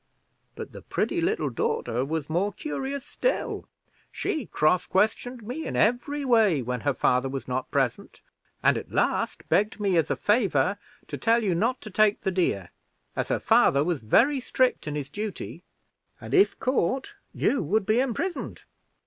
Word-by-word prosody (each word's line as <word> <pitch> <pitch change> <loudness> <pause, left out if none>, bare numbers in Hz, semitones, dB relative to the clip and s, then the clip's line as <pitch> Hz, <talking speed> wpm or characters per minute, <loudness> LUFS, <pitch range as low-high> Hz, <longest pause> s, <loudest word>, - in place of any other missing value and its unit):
But - - -7
the - - -10
pretty 345 - -1
little 390 +7 0
daughter 450 - -1
was 150 +1 -3
more 180 +6 0
curious 275 +2 -4
still. - - -2 0.4
She 300 -9 -3
cross 170 +4 +2
questioned 225 +4 0
me 255 +9 -5
in - - -4
every 275 +6 +1
way 215 - +4
when 125 +1 -3
her 145 - +1
father 125 +1 +2
was 135 0 -5
not 130 0 -2
present, 135 -4 -1 0.4
and - - +4
at - - -12
last - - 0
begged 210 +2 +1
me 195 -4 +1
as 160 -2 +2
a - - +1
favor 200 - +1 0.3
to - - -6
tell 230 0 +3
you 195 -4 +1
not 230 +9 0
to 215 - -9
take 210 +1 +3
the 190 - -1
deer, 135 - -1 0.4
as - - -1
her - - 0
father 140 +1 +4
was 170 -2 -1
very 265 - +3
strict 255 -6 0
in 150 - -3
his 145 -2 -3
duty, 205 -4 -5 0.6
and, - - -8
if 390 +1 +4
caught, 260 - 0 0.2
you 280 - +1
would 195 +5 0
be 215 +4 +2
imprisoned." 270 +8 -2
210 Hz, 170 wpm, -26 LUFS, 155-255 Hz, 0.6 s, way